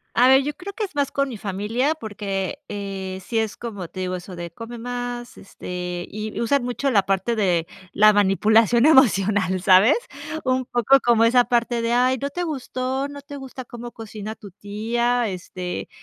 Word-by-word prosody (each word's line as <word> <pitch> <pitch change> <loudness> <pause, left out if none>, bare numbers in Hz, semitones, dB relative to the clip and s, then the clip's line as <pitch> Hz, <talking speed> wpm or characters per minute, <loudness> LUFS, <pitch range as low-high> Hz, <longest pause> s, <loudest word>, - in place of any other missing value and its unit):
A 245 - +6
ver, 265 +1 +7
yo 295 +2 -3
creo 380 +5 -8
que 435 - -3
es 370 - -13
más 285 -1 0
con 275 0 0
mi 235 - -6
familia, 215 +9 -1
porque, 205 -2 -4
eh, 195 -2 -5
sí 225 +4 -3
es 220 -2 0
como 205 -7 -6
te 185 - -10
digo, 185 0 -2
eso 180 +1 -8
de: 175 0 -6
"Come 230 +6 -8
más", 245 0 -5
este, 180 -2 -6
y 215 +1 -5
usan 255 +3 +2
mucho 250 +3 -1
la 205 -6 +3
parte 195 +4 0
de 180 -6 +1 0.3
la 215 +1 +6
manipulación 215 +4 +4
emocional, 200 - +4
¿sabes? 195 +7 +6 0.5
Un 255 -1 0
poco 245 +3 +4
como 230 -1 +4
esa 245 +1 +5
parte 235 -1 +1
de: 230 - 0
"Ay, 255 +1 +3
no 280 - -2
te 355 +3 -3
gustó. 265 -3 -3
No 285 0 -9
te 285 +1 -10
gusta 265 -1 -8
cómo 240 0 -8
cocina 215 -1 -7
tu 205 -2 -12
tía", 230 +5 -1
este 180 -1 -6
230 Hz, 185 wpm, -23 LUFS, 195-255 Hz, 0.5 s, ver